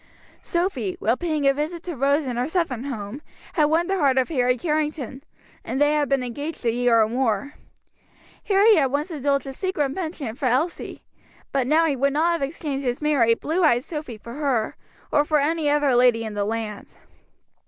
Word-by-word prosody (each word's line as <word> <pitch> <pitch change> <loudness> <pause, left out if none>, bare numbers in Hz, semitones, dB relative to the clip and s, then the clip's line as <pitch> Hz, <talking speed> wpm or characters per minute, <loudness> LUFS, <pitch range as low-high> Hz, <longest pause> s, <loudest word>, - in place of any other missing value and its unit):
Sophy, 340 - -1
while 225 +3 +2
paying 310 -3 -1
a 275 - +5
visit 315 +4 -4
to 350 -3 -5
Rose 280 +3 +2
in 250 -2 -3
her 245 +2 -1
Southern 310 -8 -1
home, 235 0 -5 0.3
had 305 - +3
won 320 +3 +2
the 385 +1 -1
heart 275 -4 +3
of 260 - +2
Harry 250 -5 +1
Carrington, 300 -4 -2 0.4
and 265 - -3
they 290 +1 +4
had 295 -1 +1
been 275 -2 +1
engaged 285 +4 -6
a 230 - +3
year 240 -1 +3
or - - +1
more. 240 +2 -1 0.9
Harry 410 +1 +5
had 280 -4 +3
once 295 +6 -1
indulged 280 -3 0
in 270 - -5
a - - -10
secret 300 -5 -1
penchant 310 -10 -5
for 265 - 0
Elsie; 285 +8 -1 0.5
but 265 -3 0
now 315 +4 +4
he 295 -4 +1
would 275 +2 +1
not 325 +4 +2
have 335 -3 -1
exchanged 280 -1 -3
his 245 -1 -1
merry, 275 -7 +3
blue 325 +9 -1
eyed 245 -6 +4
Sophy 300 -8 -6
for 235 +2 -10
her, 265 -6 -1 0.4
or 290 - +4
for 300 0 +2
any 305 +1 +1
other 290 -2 +2
lady 245 -2 +4
in 220 -1 -5
the 205 -1 -1
land. 215 -1 -5
280 Hz, 200 wpm, -23 LUFS, 245-310 Hz, 0.9 s, a